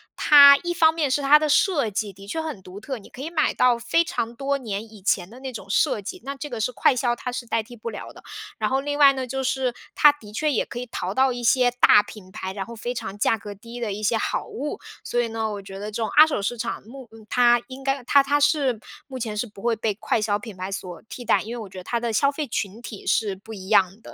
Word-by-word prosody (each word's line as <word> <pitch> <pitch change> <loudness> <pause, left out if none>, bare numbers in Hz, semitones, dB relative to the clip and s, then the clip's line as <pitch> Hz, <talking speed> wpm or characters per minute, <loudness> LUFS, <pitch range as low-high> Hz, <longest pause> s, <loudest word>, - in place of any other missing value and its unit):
它 280 -1 +8
一 345 0 -1
方 320 -2 +5
面 310 -5 -1
是 290 - +1
它 285 +2 +7
的 305 0 0
设 295 - +2
计 205 0 -2
的 195 +1 -14
确 320 +11 -3
很 300 -12 -6
独 185 +3 -10
特， 265 +3 -5
你 200 - -15
可 260 - -11
以 315 - -4
买 315 -3 +1
到 250 -1 +3
非 240 +8 +1
常 235 -7 -3
多 275 +1 -1
年 220 -3 -6
以 210 -3 -15
前 185 -2 +1
的 240 - -13
那 265 -1 -6
种 210 -3 -9
设 210 - +2
计， 200 - -7
那 275 - -3
这 295 +2 -7
个 235 - -5
是 235 +4 0
快 250 - +3
销 240 -2 0
它 250 +1 -5
是 245 -1 -5
代 230 0 0
替 240 +3 -13
不 230 0 -6
了 - - -8
的。 - - -15 0.3
然 215 +2 -1
后 270 +1 +1
另 290 +1 -3
外 280 -2 +7
呢， 260 -1 -4
就 265 +2 -3
是 255 -2 -1 0.2
它 295 - +7
的 215 -8 -14
确 305 +6 0
也 250 - 0
可 240 - -7
以 250 - -6
淘 185 -4 -4
到 260 +2 +3
一 245 0 -5
些 250 +1 +4
大 245 -4 +6
品 205 -2 -13
牌， 190 -2 -6
然 195 -1 -5
后 235 - -10
非 240 +2 -4
常 195 - -5
价 225 - +2
格 205 -1 -8
低 230 +4 -10
的 215 -4 -2
一 210 - -6
些 225 +2 +1
好 - - -2
物。 295 - -5 0.2
所 240 - 0
以 235 - -1
呢， 225 -1 -3
我 205 -1 -5
觉 195 0 -10
得 210 +2 -6
这 230 - -4
种 220 - -1
二 305 - +7
手 300 -10 -2
市 240 +4 -2
场， 230 +1 -4
目 250 +2 -12 0.2
它 240 -1 +4
应 265 +1 -10
该 270 -1 -1
它- 280 +1 +5
它 290 +1 +2
是 285 -6 +2 0.3
目 260 -2 -8
前 215 -3 -4
是 245 - -1
不 205 -3 -14
会 235 -1 +1
被 220 -1 -1
快 215 +2 -1
销 210 -1 0
品 210 -3 -10
牌 185 +2 -5
所 180 -3 -7
替 245 +3 -8
代。 - - +2
因 225 - -6
为 - - -6
我 210 -3 -8
觉 190 - -12
得 185 - -7
它 235 +4 -2
的 235 -1 -2
消 275 +6 +2
费 295 0 -4
群 215 0 -4
体 220 -4 -9
是 205 -3 +1
不 220 +4 -12
一 190 -3 -9
样 190 +3 +3
的。 - - -12
235 Hz, 305 characters per minute, -24 LUFS, 210-270 Hz, 0.3 s, 它